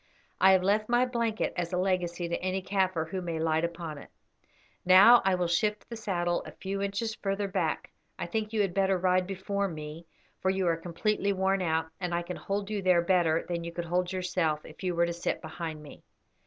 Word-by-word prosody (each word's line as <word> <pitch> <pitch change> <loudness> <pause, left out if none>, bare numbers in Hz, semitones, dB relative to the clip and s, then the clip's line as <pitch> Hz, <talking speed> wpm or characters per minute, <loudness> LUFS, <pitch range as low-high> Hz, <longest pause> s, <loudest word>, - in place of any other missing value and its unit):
I 190 0 +7
have 185 -1 +3
left 210 +3 +1
my 240 +1 +4
blanket 235 -3 -1
as 175 -1 -2
a 180 - 0
legacy 180 -2 0
to 170 - -3
any 185 +1 -1
Kaffir 185 -4 0
who 185 +1 -3
may 170 -2 -3
light 160 0 +1
upon 170 -3 -4
it. - - -13 0.7
Now 195 +7 +8
I 190 -1 +3
will 180 -1 0
shift 210 +5 0
the 235 - -7
saddle 175 -5 -1
a - - -10
few 195 +1 -4
inches 200 +3 -2
further 200 -1 -2
back. 195 0 -2 0.3
I - - -3
think 220 -1 -2
you 220 -2 +1
had 195 -3 0
better 195 0 +2
ride 180 0 +2
before 200 +1 -2
me, 155 0 -8 0.3
for 190 - 0
you 190 0 0
are 170 -1 +3
completely 200 +5 -1
worn 190 0 +1
out, 160 -2 +1
and 175 -2 -2
I 175 - -1
can 180 +1 -6
hold 200 +1 -3
you 205 -2 -1
there 180 -2 +4
better 170 -3 +2
than 170 -1 -3
you 170 - -5
could 170 0 -4
hold 180 +1 0
yourself 180 -4 -1
if 155 - -13
you 180 -2 -1
were 170 0 +3
to 170 - -2
sit 170 - -2
behind 160 -1 -6
me." 145 - -12
185 Hz, 220 wpm, -29 LUFS, 170-195 Hz, 0.7 s, Now